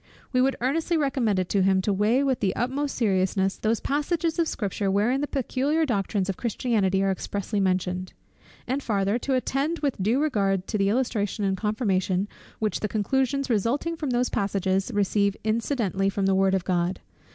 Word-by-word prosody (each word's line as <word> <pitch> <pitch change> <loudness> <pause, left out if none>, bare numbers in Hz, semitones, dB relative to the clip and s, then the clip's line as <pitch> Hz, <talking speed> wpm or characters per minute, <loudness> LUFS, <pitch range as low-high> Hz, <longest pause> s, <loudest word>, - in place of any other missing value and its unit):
We 255 - +4
would 265 +1 +2
earnestly 325 +6 +1
recommend 265 -8 +1
it 185 -1 0
to 200 - +2
him 190 0 +3
to 205 - +1
weigh 215 +7 +2
with 265 -2 +1
the 190 - 0
utmost 270 +4 -1
seriousness 190 -3 +1
those 225 +1 0
passages 320 +4 -1
of 335 - +2
Scripture 200 -4 -2
wherein 215 +8 +2
the 290 - -1
peculiar 280 +4 0
doctrines 200 -5 -1
of 195 - -2
Christianity 210 -5 0
are 195 - +2
expressly 200 +2 -3
mentioned; 185 -1 -1 0.5
and 265 +3 -1
farther, 205 -1 0
to 265 +1 0
attend 275 +6 0
with 275 -8 -1
due 225 +7 +2
regard 195 -10 +1
to 215 - -1
the 195 0 +3
illustration 215 -3 0
and 190 -1 +1
confirmation, 195 -3 0 0.3
which 215 -1 -1
the 210 - -1
conclusions 265 +6 0
resulting 250 - 0
from 305 -4 -3
those 245 0 +1
passages 195 +1 0
receive 200 -1 +1
incidentally 215 -3 0
from 195 0 -1
the 195 - +3
word 190 0 +3
of 185 - -2
God. 180 0 0
210 Hz, 180 wpm, -25 LUFS, 195-265 Hz, 0.5 s, We